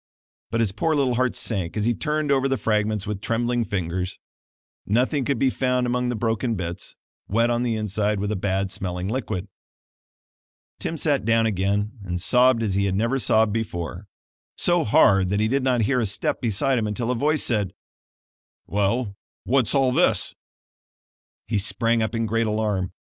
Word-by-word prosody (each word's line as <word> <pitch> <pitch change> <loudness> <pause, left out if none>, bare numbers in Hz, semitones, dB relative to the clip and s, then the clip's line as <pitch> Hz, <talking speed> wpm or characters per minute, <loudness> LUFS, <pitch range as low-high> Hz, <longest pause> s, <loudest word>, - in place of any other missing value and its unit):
But 115 +1 0
his 110 -4 +1
poor 155 +10 0
little 135 -4 +2
heart 130 0 0
sank 95 -4 -2
as 105 - 0
he 120 - +2
turned 150 +2 -1
over 135 -1 +3
the 135 0 0
fragments 105 -2 0
with 105 -1 -4
trembling 120 +1 0
fingers. 90 -2 -3 0.7
Nothing 130 +6 +1
could 140 0 0
be 130 +2 +2
found 125 -1 0
among 125 0 0
the 120 - -1
broken 115 +1 -1
bits, 85 -3 -6 0.3
wet 115 +3 +2
on 120 0 0
the 120 -2 0
inside 105 -1 -1
with 105 +1 -2
a - - 0
bad 95 0 -1
smelling 90 -1 -4
liquid. 105 -6 -3 1.3
Tim 165 - -3
sat 145 -2 +1
down 115 0 +3
again 105 +2 -1
and 90 -2 -3
sobbed 125 +4 +4
as 105 -3 0
he 100 +1 +1
had 95 -1 0
never 115 +6 +1
sobbed 110 -3 +3
before; 95 -3 -4 0.5
so 175 -1 +2
hard 95 -3 +4
that 100 +1 0
he 110 - +2
did 135 +4 +1
not 130 -2 +1
hear 125 +4 +1
a 115 - +1
step 100 - -1
beside 125 +3 +1
him 110 - -1
until 115 +3 -2
a - - 0
voice 150 +5 +1
said: 105 -6 0 0.9
"Well, 100 +2 0 0.3
what's 130 0 +2
all 135 -2 +3
this?" 165 +8 +2 1.1
He 105 - 0
sprang 115 +3 +1
up 110 +1 -1
in 115 0 0
great 115 +1 0
alarm. 105 -4 -1
115 Hz, 180 wpm, -24 LUFS, 100-125 Hz, 1.3 s, sobbed